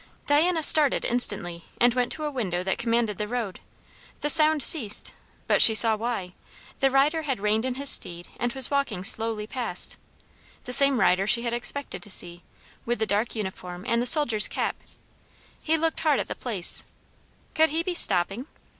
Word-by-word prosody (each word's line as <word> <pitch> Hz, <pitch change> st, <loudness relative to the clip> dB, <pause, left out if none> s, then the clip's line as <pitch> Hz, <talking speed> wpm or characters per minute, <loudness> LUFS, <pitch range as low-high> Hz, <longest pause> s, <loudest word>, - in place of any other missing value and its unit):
Diana 320 Hz, +3 st, 0 dB
started 295 Hz, -2 st, +4 dB
instantly 175 Hz, -8 st, -1 dB
and 240 Hz, 0 st, +2 dB
went 250 Hz, 0 st, -3 dB
to 310 Hz, -, -9 dB
a 300 Hz, -, -4 dB
window 185 Hz, -10 st, -5 dB
that 190 Hz, -, -4 dB
commanded 230 Hz, -3 st, -3 dB
the 210 Hz, -, -4 dB
road. 225 Hz, -5 st, -6 dB, 0.6 s
The 295 Hz, -, +2 dB
sound 310 Hz, -2 st, +3 dB
ceased, 230 Hz, -7 st, +3 dB, 0.3 s
but -, -, 0 dB
she 220 Hz, -, +7 dB
saw 225 Hz, 0 st, +6 dB
why; 215 Hz, -5 st, -6 dB, 0.5 s
the 270 Hz, -, +1 dB
rider 285 Hz, +4 st, 0 dB
had 270 Hz, -7 st, -5 dB
reined 210 Hz, +3 st, -2 dB
in 255 Hz, -1 st, -4 dB
his 280 Hz, +1 st, +2 dB
steed 175 Hz, 0 st, -2 dB
and 245 Hz, -, -3 dB
was 265 Hz, 0 st, +1 dB
walking 275 Hz, -10 st, -3 dB
slowly 220 Hz, +1 st, 0 dB
past; 245 Hz, +2 st, -5 dB, 0.7 s
the 250 Hz, -, -7 dB
same 275 Hz, -1 st, +3 dB
rider 190 Hz, 0 st, 0 dB
she 235 Hz, +2 st, +3 dB
had 235 Hz, -1 st, -4 dB
expected 240 Hz, -4 st, -2 dB
to 205 Hz, -, -7 dB
see, 175 Hz, -2 st, +4 dB, 0.4 s
with 240 Hz, +1 st, -4 dB
the 220 Hz, -, -3 dB
dark 215 Hz, +3 st, -3 dB
uniform 185 Hz, -3 st, -8 dB
and 235 Hz, 0 st, -1 dB
the 245 Hz, -, +2 dB
soldier's 235 Hz, -8 st, +5 dB
cap. -, -, -4 dB, 0.9 s
He 320 Hz, +1 st, -1 dB
looked 325 Hz, 0 st, -3 dB
hard 305 Hz, -4 st, 0 dB
at -, -, -5 dB
the -, -, -4 dB
place; 210 Hz, -8 st, +2 dB, 0.7 s
could 320 Hz, 0 st, +1 dB
he 325 Hz, +2 st, -3 dB
be 365 Hz, -, -4 dB
stopping? 200 Hz, -, 0 dB
240 Hz, 180 wpm, -23 LUFS, 210-280 Hz, 0.9 s, she